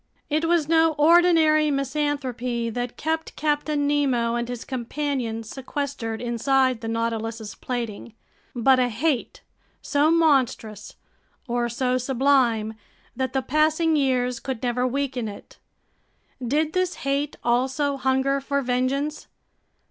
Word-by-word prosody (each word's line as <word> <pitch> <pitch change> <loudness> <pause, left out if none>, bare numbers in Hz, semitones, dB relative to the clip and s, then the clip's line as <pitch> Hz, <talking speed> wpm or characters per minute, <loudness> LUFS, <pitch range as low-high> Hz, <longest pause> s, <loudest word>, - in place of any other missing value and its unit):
It 310 +2 +1
was 330 -3 +2
no 325 0 +4
ordinary 315 -1 +5
misanthropy 265 -4 -2
that 245 +1 -4
kept 320 +1 -2
Captain 295 -1 0
Nemo 265 -5 +1
and 240 0 -2
his 245 -2 -5
companions 250 -3 -3
sequestered 265 -4 -4
inside 250 +1 +1
the 225 - -5
Nautilus's 225 -1 -3
plating, 235 -2 -5 0.4
but 255 +2 +4
a 250 -1 +2
hate 255 +3 -1 0.4
so 290 +2 +2
monstrous 260 - +1 0.5
or 240 0 0
so 250 +2 0
sublime 250 -4 +2 0.4
that 260 0 -2
the 265 -1 0
passing 310 +3 +2
years 250 -4 +1
could 260 -3 -5
never 250 +1 +1
weaken 260 -3 -2
it. 205 - -11 0.8
Did 300 +6 0
this 370 -1 0
hate 280 +1 -1
also 265 +4 +1
hunger 265 +1 +1
for 280 0 -1
vengeance? 260 +4 -1
265 Hz, 120 wpm, -24 LUFS, 240-295 Hz, 0.8 s, ordinary